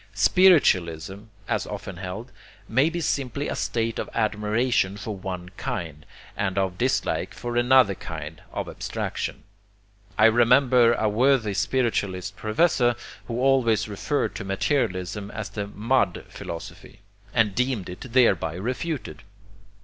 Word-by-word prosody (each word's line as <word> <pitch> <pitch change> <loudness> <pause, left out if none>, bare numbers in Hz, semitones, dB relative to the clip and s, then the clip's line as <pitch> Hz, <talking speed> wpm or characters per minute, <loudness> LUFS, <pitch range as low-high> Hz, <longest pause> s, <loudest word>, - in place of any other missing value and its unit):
Spiritualism, 95 - +3 0.2
as - - -1
often 95 - -6
held, 95 +7 -6 0.4
may 130 +7 +3
be 170 +1 -3
simply 140 -1 -1
a - - -2
state 115 -1 -1
of - - -4
admiration 110 -1 +1
for 105 +1 -5
one 90 -2 -6
kind, 80 -6 -5 0.3
and 95 -1 -2
of 95 -2 0
dislike 125 +2 0
for 120 0 -5
another 120 -3 +5
kind, 80 -3 -8
of - - -4
abstraction. - - -4 0.7
I 110 - +6
remember 120 +1 +5
a 110 -2 0
worthy 115 0 +2
spiritualist 100 -4 -1
professor 120 - +2 0.3
who 120 0 -3
always 125 -5 +3
referred 105 +8 -1
to - - -5
materialism 95 -1 -1
as 110 0 -5
the 100 -2 -4
'mud 105 -2 0
philosophy,' 85 -1 -9 0.3
and 105 -3 +2
deemed 125 -4 -1
it 90 0 -8
thereby 115 -10 +3
refuted. 125 - -4
110 Hz, 125 wpm, -25 LUFS, 95-125 Hz, 0.7 s, I